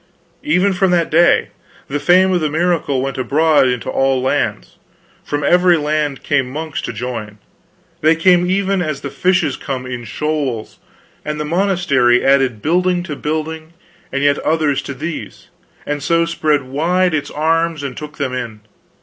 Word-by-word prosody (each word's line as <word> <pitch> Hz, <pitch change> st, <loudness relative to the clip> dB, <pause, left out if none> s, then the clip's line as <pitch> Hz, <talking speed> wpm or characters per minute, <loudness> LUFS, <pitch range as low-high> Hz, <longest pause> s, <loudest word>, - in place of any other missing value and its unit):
"Even 180 Hz, +6 st, +2 dB
from 190 Hz, +1 st, +1 dB
that 175 Hz, -2 st, +1 dB
very 165 Hz, +3 st, +5 dB, 0.2 s
day. -, -, -20 dB, 0.4 s
The 145 Hz, +2 st, -2 dB
fame 185 Hz, +5 st, +4 dB
of 180 Hz, -2 st, +1 dB
the 155 Hz, -, 0 dB
miracle 160 Hz, -4 st, 0 dB
went 135 Hz, -1 st, -4 dB
abroad 145 Hz, +2 st, +3 dB
into 125 Hz, -2 st, -2 dB
all 135 Hz, -1 st, +1 dB
lands. 125 Hz, -, -2 dB, 0.5 s
From 145 Hz, 0 st, -3 dB
every 180 Hz, +2 st, +4 dB
land 150 Hz, -2 st, -1 dB
came 135 Hz, -3 st, 0 dB
monks 155 Hz, +2 st, -5 dB
to -, -, -4 dB
join; 110 Hz, -2 st, -6 dB, 0.6 s
they 160 Hz, +1 st, +4 dB
came 180 Hz, +1 st, +3 dB
even 195 Hz, 0 st, +1 dB
as 155 Hz, -4 st, -3 dB
the 140 Hz, -, -6 dB
fishes 175 Hz, 0 st, +1 dB
come, 130 Hz, -2 st, -5 dB
in 125 Hz, -1 st, -6 dB
shoals; 140 Hz, -3 st, -3 dB, 0.4 s
and 150 Hz, 0 st, -4 dB
the 150 Hz, -, -2 dB
monastery 165 Hz, -8 st, +2 dB
added 135 Hz, -5 st, +2 dB
building 180 Hz, +2 st, +1 dB
to 150 Hz, -5 st, -5 dB
building, 155 Hz, +2 st, -4 dB, 0.4 s
and 140 Hz, +1 st, -1 dB
yet 145 Hz, 0 st, +3 dB
others 155 Hz, -3 st, 0 dB
to 140 Hz, -, -7 dB
these, 155 Hz, +5 st, -7 dB, 0.4 s
and 145 Hz, 0 st, -3 dB
so 165 Hz, +4 st, +2 dB
spread 155 Hz, -4 st, 0 dB
wide 170 Hz, +7 st, 0 dB
its 145 Hz, -2 st, -2 dB
arms 165 Hz, 0 st, 0 dB
and 135 Hz, -3 st, -5 dB
took 150 Hz, +2 st, -9 dB
them 135 Hz, -3 st, -2 dB
in. 115 Hz, -4 st, -5 dB
150 Hz, 165 wpm, -17 LUFS, 135-170 Hz, 0.6 s, very